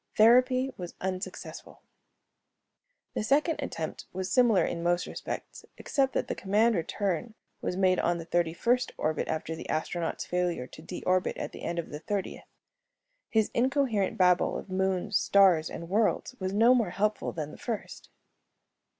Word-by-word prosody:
Therapy 255 Hz, +4 st, +5 dB
was 175 Hz, -2 st, -7 dB
unsuccessful. 185 Hz, +2 st, -6 dB, 1.3 s
The -, -, -2 dB
second 295 Hz, +6 st, +2 dB
attempt 160 Hz, -, -5 dB
was 185 Hz, 0 st, -4 dB
similar 240 Hz, -6 st, +4 dB
in 170 Hz, -, -3 dB
most 175 Hz, +1 st, +1 dB
respects, -, -, -6 dB
except 270 Hz, -1 st, 0 dB
that -, -, -1 dB
command 215 Hz, +4 st, +3 dB
return 195 Hz, +3 st, -2 dB, 0.3 s
was 180 Hz, -, -2 dB
made 185 Hz, -1 st, +3 dB
on 175 Hz, 0 st, +1 dB
the 165 Hz, -, -7 dB
thirty 170 Hz, -1 st, +1 dB
first 245 Hz, +9 st, +1 dB
orbit 155 Hz, -1 st, -1 dB
after 160 Hz, 0 st, -3 dB
the -, -, -9 dB
astronaut's 165 Hz, +2 st, -2 dB
failure 175 Hz, -7 st, -1 dB
to 145 Hz, -, -13 dB
de 175 Hz, +3 st, -7 dB
orbit 185 Hz, 0 st, +1 dB
at -, -, -4 dB
the -, -, -10 dB
end 170 Hz, -, -3 dB
of 170 Hz, -, -4 dB
the 150 Hz, -, -5 dB
thirtieth. 195 Hz, +4 st, -4 dB, 0.8 s
His 220 Hz, -2 st, +2 dB
incoherent 250 Hz, -6 st, +1 dB
babble 180 Hz, -1 st, +3 dB
of 190 Hz, -, -9 dB
moons, 190 Hz, +1 st, +1 dB
stars, 185 Hz, -5 st, +4 dB
and 170 Hz, -, -7 dB
worlds 215 Hz, +6 st, +1 dB
was 185 Hz, -1 st, -2 dB
no 225 Hz, +5 st, +5 dB
more 235 Hz, -7 st, +2 dB
helpful 210 Hz, +4 st, -1 dB
than 150 Hz, -2 st, -5 dB
the -, -, -11 dB
first. 230 Hz, -4 st, -5 dB
190 Hz, 160 wpm, -29 LUFS, 175-225 Hz, 1.3 s, Therapy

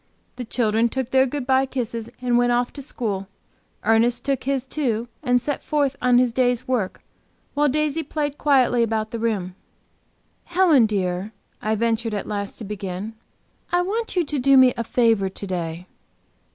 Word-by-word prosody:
The 250 Hz, -, -5 dB
children 225 Hz, 0 st, +1 dB
took 260 Hz, 0 st, -3 dB
their 265 Hz, 0 st, +4 dB
good 280 Hz, 0 st, -4 dB
by 265 Hz, +1 st, +3 dB
kisses 235 Hz, -3 st, -4 dB
and 250 Hz, -1 st, 0 dB
went 245 Hz, 0 st, +3 dB
off 240 Hz, 0 st, 0 dB
to 285 Hz, -, -7 dB
school; 210 Hz, -8 st, -4 dB, 0.6 s
Ernest 225 Hz, +2 st, +2 dB
took 275 Hz, -3 st, -1 dB
his, 270 Hz, -1 st, 0 dB
too, 245 Hz, -5 st, -1 dB
and 250 Hz, -4 st, +2 dB
set 290 Hz, +3 st, -3 dB
forth 285 Hz, -3 st, 0 dB
on 250 Hz, -1 st, +4 dB
his 250 Hz, -2 st, +3 dB
day's 245 Hz, -1 st, +1 dB
work, 235 Hz, -8 st, -2 dB, 0.5 s
while 295 Hz, 0 st, +2 dB
Daisy 305 Hz, +2 st, 0 dB
played 295 Hz, -1 st, -3 dB
quietly 255 Hz, -4 st, +3 dB
about 220 Hz, -1 st, 0 dB
the 230 Hz, -, -4 dB
room. 205 Hz, -6 st, -1 dB, 0.9 s
"Helen, 335 Hz, -9 st, +4 dB
dear," 190 Hz, 0 st, -2 dB, 0.3 s
I 215 Hz, +1 st, 0 dB
ventured 225 Hz, 0 st, 0 dB
at 200 Hz, -, -3 dB
last 200 Hz, -1 st, -4 dB
to -, -, -7 dB
begin 195 Hz, 0 st, -5 dB, 0.6 s
"I 350 Hz, 0 st, +3 dB
want 440 Hz, +4 st, -3 dB
you 355 Hz, -2 st, +2 dB
to 290 Hz, -1 st, -2 dB
do 275 Hz, +1 st, +5 dB
me 255 Hz, -1 st, +7 dB
a 235 Hz, -, -2 dB
favor 225 Hz, -4 st, +2 dB
to 195 Hz, -, -7 dB
day." 175 Hz, -2 st, -4 dB
245 Hz, 175 wpm, -23 LUFS, 220-270 Hz, 0.9 s, me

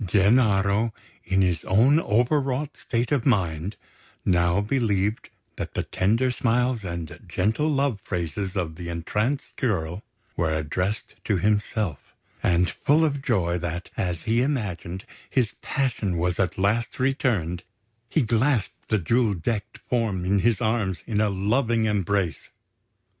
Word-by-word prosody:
Gennaro, 100 Hz, +1 st, +3 dB, 0.3 s
in 95 Hz, +1 st, +2 dB
his 90 Hz, -3 st, 0 dB
own 125 Hz, +11 st, +5 dB
over 125 Hz, +3 st, +2 dB
wrought 140 Hz, +2 st, -2 dB
state 120 Hz, +2 st, -2 dB
of 140 Hz, -5 st, +2 dB
mind, 95 Hz, -, +1 dB, 0.5 s
now 85 Hz, 0 st, +3 dB
believed 105 Hz, -2 st, 0 dB, 0.3 s
that -, -, -5 dB
the -, -, 0 dB
tender 115 Hz, +7 st, +1 dB
smiles 125 Hz, -1 st, +1 dB
and 85 Hz, -3 st, -5 dB
gentle 110 Hz, +11 st, +1 dB
love 140 Hz, -7 st, +1 dB
phrases 90 Hz, +3 st, -3 dB
of 80 Hz, -4 st, -2 dB
the 85 Hz, 0 st, -6 dB
entranced 105 Hz, -, -2 dB
girl 90 Hz, -6 st, -1 dB, 0.3 s
were 80 Hz, -2 st, +1 dB
addressed 90 Hz, +7 st, -2 dB
to 105 Hz, -, +2 dB
himself; 105 Hz, -, 0 dB, 0.4 s
and, 90 Hz, +1 st, +3 dB
full 150 Hz, -, +2 dB
of 140 Hz, -2 st, -1 dB
joy 90 Hz, -10 st, +1 dB
that, 85 Hz, +1 st, -4 dB
as 90 Hz, -3 st, -2 dB
he 115 Hz, +2 st, +2 dB
imagined, 100 Hz, -, -2 dB, 0.2 s
his 125 Hz, -6 st, +1 dB
passion 115 Hz, -, -1 dB
was 90 Hz, +1 st, 0 dB
at 95 Hz, -, 0 dB
last 105 Hz, +5 st, 0 dB
returned, 115 Hz, -, 0 dB, 0.5 s
he 155 Hz, -6 st, +2 dB
clasped 115 Hz, 0 st, 0 dB
the 110 Hz, -, +3 dB
jewel 110 Hz, +3 st, +2 dB
decked 105 Hz, +4 st, -3 dB
form 110 Hz, -7 st, 0 dB
in 100 Hz, +2 st, +2 dB
his 115 Hz, +2 st, +2 dB
arms 110 Hz, -5 st, 0 dB
in 105 Hz, -2 st, 0 dB
a 105 Hz, -, +3 dB
loving 110 Hz, +4 st, +1 dB
embrace. 100 Hz, -4 st, 0 dB
105 Hz, 140 wpm, -25 LUFS, 90-120 Hz, 0.5 s, own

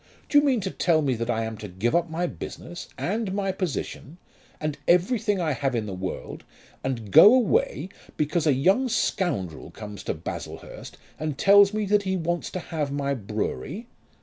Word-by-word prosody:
Do 290 Hz, -, +6 dB
you -, -, +1 dB
mean 260 Hz, -6 st, +2 dB
to 190 Hz, 0 st, -3 dB
tell 160 Hz, -3 st, +2 dB
me 135 Hz, -2 st, +1 dB
that 115 Hz, 0 st, -3 dB
I 115 Hz, -1 st, 0 dB
am 110 Hz, -1 st, -5 dB
to 105 Hz, -, -6 dB
give 95 Hz, +6 st, -1 dB
up 170 Hz, -1 st, +2 dB
my 165 Hz, +2 st, -1 dB
business, 175 Hz, 0 st, -7 dB
and 210 Hz, +1 st, -2 dB
my 195 Hz, -1 st, 0 dB
position, 175 Hz, -3 st, -4 dB, 0.4 s
and 155 Hz, -1 st, -2 dB
everything 205 Hz, +3 st, +2 dB
I 165 Hz, -3 st, 0 dB
have 135 Hz, -2 st, -1 dB
in 110 Hz, -2 st, -1 dB
the 100 Hz, -, -5 dB
world, 95 Hz, 0 st, -5 dB, 0.4 s
and 115 Hz, -6 st, -3 dB
go 205 Hz, -, +10 dB
away 455 Hz, -, +1 dB, 0.3 s
because 155 Hz, +2 st, 0 dB
a 145 Hz, -, +5 dB
young 190 Hz, -, +3 dB
scoundrel 175 Hz, -, -1 dB
comes 105 Hz, -2 st, -9 dB
to -, -, -1 dB
Baslehurst 80 Hz, -, -8 dB, 0.2 s
and 155 Hz, -3 st, -3 dB
tells 200 Hz, +3 st, +6 dB
me 215 Hz, -1 st, -1 dB
that 205 Hz, +1 st, +3 dB
he 190 Hz, -1 st, -1 dB
wants 175 Hz, 0 st, -2 dB
to 185 Hz, -, -2 dB
have 155 Hz, -4 st, -3 dB
my 140 Hz, 0 st, -1 dB
brewery? 110 Hz, -, -4 dB
165 Hz, 185 wpm, -25 LUFS, 125-195 Hz, 0.4 s, go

